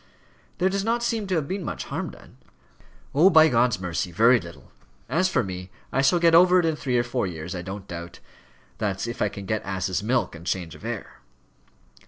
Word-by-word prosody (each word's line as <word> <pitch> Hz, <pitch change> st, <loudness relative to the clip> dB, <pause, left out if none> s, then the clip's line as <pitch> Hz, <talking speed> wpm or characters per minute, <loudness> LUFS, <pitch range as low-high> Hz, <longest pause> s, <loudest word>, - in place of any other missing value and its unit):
"There 185 Hz, -, +2 dB
does 195 Hz, +1 st, -1 dB
not 235 Hz, +2 st, 0 dB
seem 225 Hz, -4 st, -1 dB
to 185 Hz, -, 0 dB
have 155 Hz, -4 st, -1 dB
been 190 Hz, +2 st, -3 dB
much -, -, -4 dB
harm -, -, -4 dB
done?" -, -, -16 dB, 0.8 s
"Oh! 160 Hz, +8 st, +6 dB
by 160 Hz, -3 st, +7 dB
God's 120 Hz, -5 st, +2 dB
mercy, 90 Hz, 0 st, -3 dB
very 115 Hz, +7 st, +5 dB
little. 85 Hz, -3 st, -12 dB, 0.4 s
As 185 Hz, +3 st, +1 dB
for -, -, +1 dB
me, 90 Hz, -1 st, -6 dB, 0.2 s
I 135 Hz, -, +2 dB
shall 155 Hz, +6 st, +4 dB
get 170 Hz, -1 st, +4 dB
over 180 Hz, +2 st, +7 dB
it 175 Hz, -, +1 dB
in 160 Hz, -1 st, +1 dB
three 130 Hz, -4 st, -1 dB
or 120 Hz, -, +2 dB
four 120 Hz, -3 st, -2 dB
years 85 Hz, 0 st, -6 dB
I 90 Hz, -, -4 dB
don't 95 Hz, +2 st, -7 dB
doubt 85 Hz, 0 st, -8 dB, 0.6 s
that's 100 Hz, -2 st, -1 dB
if 120 Hz, 0 st, -5 dB
I 105 Hz, -, +2 dB
can 100 Hz, 0 st, -8 dB
get 110 Hz, +1 st, -2 dB
ass's 95 Hz, -1 st, -2 dB
milk 120 Hz, +4 st, 0 dB
and 85 Hz, -1 st, -10 dB
change 85 Hz, -2 st, -3 dB
of -, -, -14 dB
air." -, -, -6 dB
120 Hz, 215 wpm, -25 LUFS, -, 0.8 s, by